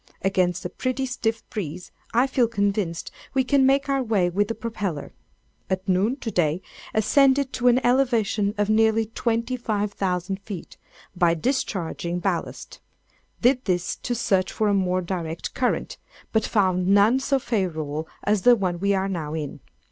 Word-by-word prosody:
Against 185 -3 +1
a - - -2
pretty 255 +6 -2
stiff 230 -3 -2
breeze, 180 -5 -5 0.2
I 240 +3 +4
feel 260 -3 +2
convinced, 200 -6 -1 0.2
we 265 - +4
can 265 0 +3
make 275 +1 +3
our 275 -1 +1
way 205 -7 +1
with 205 +3 +1
the 225 - -3
propeller. 210 -9 -4 0.6
At 190 +2 -2
noon, 195 +7 +2
to 225 - -3
day, 170 0 +1 0.3
ascended 270 +5 +3
to 250 - +1
an 245 0 +6
elevation 230 -5 +2
of 205 0 +1
nearly 220 +1 +3
25,000 210 -5 -2
feet, 200 -4 -8 0.4
by 175 -1 +3
discharging 175 - -2
ballast. 175 - -3 0.6
Did 250 +1 +3
this 180 -2 0
to 245 - -3
search 190 -5 +1
for 215 -1 0
a - - +2
more 185 -2 +1
direct 170 -2 -4
current, 250 - -1 0.3
but 220 -1 +1
found 185 -3 +1
none 205 +6 +5
so 275 +1 +1
favorable 160 - -2 0.2
as 205 -1 +2
the 245 +3 +7
one 180 -5 -2
we 200 +1 +2
are 190 0 0
now 160 -5 -3
in. 150 -3 -5
205 Hz, 155 wpm, -24 LUFS, 180-240 Hz, 0.6 s, the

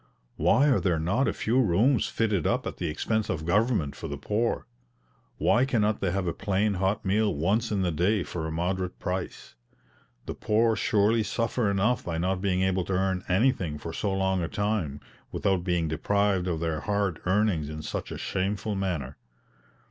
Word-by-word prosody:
Why 90 - +4
are 135 - +4
there 90 -4 +1
not 95 +12 +1
a - - +2
few 120 +4 +1
rooms 115 +5 +3
fitted 105 -7 0
up - - 0
at - - -5
the 85 - -2
expense 110 +8 -1
of 80 0 -2
government 105 - +1
for - - -6
the 75 - -5
poor? 105 +10 -1 0.7
Why 120 - +3
cannot 110 -5 +1
they 95 - +1
have 95 +1 -1
a 85 - -1
plain 100 +1 0
hot 95 +2 -1
meal 105 0 +2
once 105 +10 0
in 100 -2 +1
the 90 - +1
day 90 +5 +1
for 80 -2 -4
a - - -4
moderate 90 +2 -2
price? 90 0 -5 0.7
The - - -4
poor 110 +1 +2
surely 110 +2 +2
suffer 115 +1 0
enough 100 +5 +1
by 85 -2 -2
not 90 +2 -1
being 95 -2 +1
able 95 -1 +1
to 95 - -3
earn 95 0 0
anything 95 - +1
for 80 +2 -7
so 100 +3 -1
long 95 -1 +1
a 85 - -1
time, 100 -9 -2 0.3
without 95 -3 0
being 90 -3 0
deprived 95 +4 +1
of 85 -3 -2
their 80 -2 -1
hard 100 -1 -1
earnings 95 -6 +1
in 75 0 -6
such - - -5
a - - -5
shameful 100 +3 -2
manner! 95 -6 -3
95 Hz, 185 wpm, -27 LUFS, 85-105 Hz, 0.7 s, Why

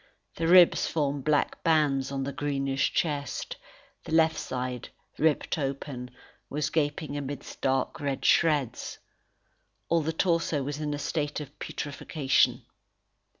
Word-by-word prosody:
The 165 - -1
ribs 180 0 +6
formed 145 -3 -1
black 150 -1 +1
bands 145 -5 +2
on 135 -1 -2
the 140 +1 -4
greenish 135 -2 0
chest; 145 -4 -2 0.5
the - - -9
left 160 0 +4
side, 125 -1 -4 0.3
ripped 160 +1 +1
open, 135 -2 -4 0.4
was 145 0 -1
gaping 150 -1 -1
amidst 145 0 -6
dark 135 -1 0
red 140 -2 -2
shreds. 145 -8 +2 0.9
All 170 0 +3
the 160 +1 -1
torso 165 -3 +1
was 145 +2 -4
in 150 -1 -2
a - - -4
state 150 0 -2
of 150 - -7
putrefaction. 145 -1 0
145 Hz, 130 wpm, -28 LUFS, 135-155 Hz, 0.9 s, ribs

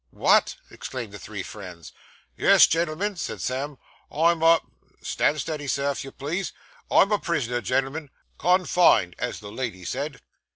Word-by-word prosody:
'What!' - - +3 0.2
exclaimed 120 -5 -6
the 105 - -8
three 100 -1 -6
friends. 90 -5 -10 0.4
'Yes, - - +7
gen'l'm'n,' 170 +5 -1
said - - -4
Sam, 135 +2 -3 0.3
'I'm 165 +1 +2
a 165 0 +6 0.4
stand 150 - +1
steady, 150 -3 -4
sir, 140 +1 0
if 140 - -5
you 135 - -9
please 170 +7 -4 0.4
I'm 200 - +5
a 210 - +3
prisoner, 125 -8 -1
gen'l'm'n. 135 +6 -1 0.3
Con 180 +1 +3
fined, 90 - +4
as 125 - -3
the 105 -1 -9
lady 105 -8 -5
said. 140 - -4
140 Hz, 155 wpm, -25 LUFS, 120-165 Hz, 0.4 s, Yes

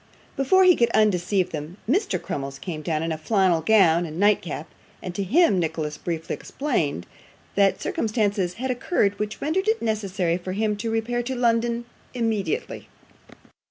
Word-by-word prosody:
Before 375 +8 +4
he 365 -2 +7
could 235 -1 +2
undeceive 195 -3 +2
them, 155 +3 -6
Mr. 385 - +1
Crummles 135 -1 -5
came 155 +2 -6
down 155 0 -1
in 165 - -2
a 160 - -3
flannel 185 -2 +2
gown 175 -3 +4
and 155 +2 -7
nightcap; 195 -6 +1 0.3
and 180 - -6
to 200 - -3
him 210 - +3
Nicholas 160 -2 -2
briefly 165 -2 -3
explained 165 - -2 0.5
that 200 -1 +3
circumstances 205 -5 0
had 260 +3 -2
occurred 220 - 0
which 210 0 -3
rendered 365 +7 0
it 445 +1 +2
necessary 195 -6 -1
for 185 +1 -5
him 210 +1 0
to 225 +2 -3
repair 225 +2 -1
to 260 +2 -4
London 235 0 +1 0.3
immediately. 230 - -2
205 Hz, 160 wpm, -24 LUFS, 170-235 Hz, 0.5 s, he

